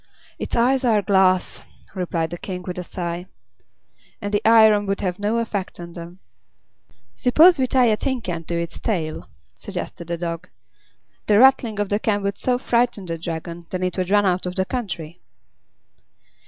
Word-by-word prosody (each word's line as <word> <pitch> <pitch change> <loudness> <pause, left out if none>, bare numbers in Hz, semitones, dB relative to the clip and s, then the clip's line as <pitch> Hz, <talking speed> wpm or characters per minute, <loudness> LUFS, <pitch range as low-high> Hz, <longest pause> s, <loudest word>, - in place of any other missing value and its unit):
"Its - - -3
eyes 255 +3 +2
are 220 -4 +3
glass," 190 -1 +2 0.3
replied 170 -4 -2
the 175 - -5
King 180 -2 -6
with 180 0 -5
a - - -4
sigh, 175 0 -5 0.9
"and 205 -1 -5
the 205 - +2
iron 220 -2 +6
would 195 0 -1
have 180 -1 -2
no 210 +3 0
effect 205 -6 -3
on 170 0 -8
them." 170 +1 -9 1.0
"Suppose 310 +6 +5
we 260 - +2
tie 255 -1 +3
a 220 -2 +3
tin 260 +3 -2
can 175 -6 -5
to 170 - -3
its 170 0 -5
tail," 165 -8 -3 0.2
suggested 170 - -7
the 170 0 -2
Dog. 170 +1 -5 0.8
"The 210 - +4
rattling 240 -3 +4
of 205 -1 -1
the 205 - +1
can 205 -2 0
would 200 0 -2
so 250 -1 +1
frighten 240 -4 0
the 165 -1 -4
Dragon 170 0 -6
that 185 0 -3
it 185 - -1
would 185 -1 -2
run 205 0 +4
out 185 -1 +1
of 180 - -5
the 190 - +1
country." 180 -8 -5
190 Hz, 180 wpm, -22 LUFS, 175-220 Hz, 1.0 s, iron